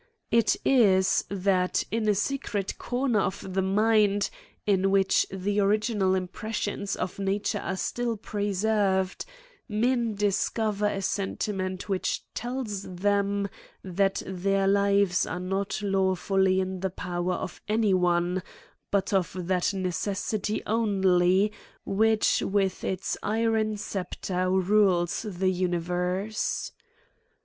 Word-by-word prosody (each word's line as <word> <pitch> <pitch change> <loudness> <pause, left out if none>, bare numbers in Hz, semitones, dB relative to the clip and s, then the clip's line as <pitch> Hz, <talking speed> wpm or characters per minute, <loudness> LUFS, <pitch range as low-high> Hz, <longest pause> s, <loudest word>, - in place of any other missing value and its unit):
It 230 -1 +4
is, 195 -8 +4
that, 190 -2 +1
in 220 0 0
a 205 - +3
secret 210 -3 -2
corner 245 -2 0
of 190 -1 -3
the 190 - +1
mind, 205 0 +2 0.3
in 195 -2 +2
which 195 -1 +3
the 195 +2 -1
original 205 -1 +2
impressions 205 +2 -3
of 185 - -4
nature 200 +1 -1
are 190 - -3
still 235 +4 -2
preserved, 200 -2 0 0.4
men 230 +1 +1
discover 210 +1 0
a 195 -1 -2
senti 200 +2 -1
ment 185 -2 -4
which 195 -2 -1
tells 240 -4 -3
them, 200 +2 0 0.4
that 195 +1 0
their 195 +1 0
lives 200 -2 +3
are 180 - -4
not 195 +3 -2
law 190 -1 +2
fully 190 +1 +2
in 190 0 -2
the 190 +1 -1
power 175 0 -3
of - - -6
any 215 -2 +2
one, 180 0 +2 0.5
but 200 0 0
of 185 -3 +1
tHat 180 0 0
necessity 195 +3 -2
only 195 -3 +3 0.3
which 220 +2 +2
with 195 -2 0
its 190 0 -2
iron 220 0 0
sceptre 185 -2 -3
rules 190 -2 +2
the 185 0 0
uni 180 -1 0
verse. 180 +5 -2
195 Hz, 120 wpm, -27 LUFS, 185-210 Hz, 0.5 s, It